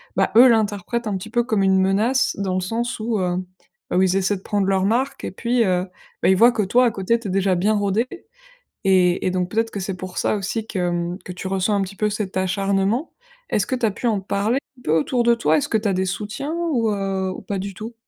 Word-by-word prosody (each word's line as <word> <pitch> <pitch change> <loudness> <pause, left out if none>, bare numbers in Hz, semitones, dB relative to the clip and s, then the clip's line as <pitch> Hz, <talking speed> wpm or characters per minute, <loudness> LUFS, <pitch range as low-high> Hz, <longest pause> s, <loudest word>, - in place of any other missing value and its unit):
ben, - - +3
eux 250 +3 +9
l'interprètent 220 0 0
un 195 -2 -1
petit 215 +4 -9
peu 240 - +2
comme 215 -5 0
une 190 0 +4
menace 220 +7 +2
dans 190 -2 -1
le 185 - +1
sens 230 +5 -3
où, 220 0 -1
heu, 180 -1 0 0.6
où 185 - +3
ils 190 0 +2
essaient 195 +1 +1
de - - -14
prendre 205 -2 -1
leur 190 -1 +2
marque 250 +6 0
et - - -3
puis, 235 +4 +1
heu, 180 0 +1 0.4
beh, - - +5
ils - - +5
voient 235 +3 +7
que 215 - -1
toi, 245 +6 +3
à 235 - +3
côté, 210 +4 0
tu 220 - -7
es - - -3
déjà 195 -1 +2
bien 205 +5 +2
rodée 205 +4 0 0.8
et 180 -2 +3
et - - +2
donc 180 -1 -1
peut-être 225 +1 0
que 200 - -5
c'est 190 0 -4
pour 185 +1 -7
ça - - +1
aussi 215 +3 -3
que, 205 - -5
hem, 175 0 -1
que 180 - -6
tu 185 +1 -7
ressens 195 +2 0
un 195 - +1
petit 195 +1 -5
peu 210 +1 0
cet 200 -2 -4
acharnement. 195 - 0 0.4
Est-ce 205 - +1
que 255 - -1
tu 240 -2 +1
as - - +1
pu 240 - -5
en 210 -3 +1
parler 200 +6 0 0.2
un - - -17
peu 155 - 0
autour 240 - 0
de 235 0 +5
toi? 235 - +2
Est-ce 290 0 -2
que 220 - +1
tu 215 - -4
as - - +2
des 185 +1 0
soutiens 215 - -4 0.2
ou 230 -4 +1
heu, 195 -2 -1
ou - - -8
pas 200 - -3
du 195 0 -5
tout? 225 +3 -8
200 Hz, 260 wpm, -22 LUFS, 190-230 Hz, 0.8 s, eux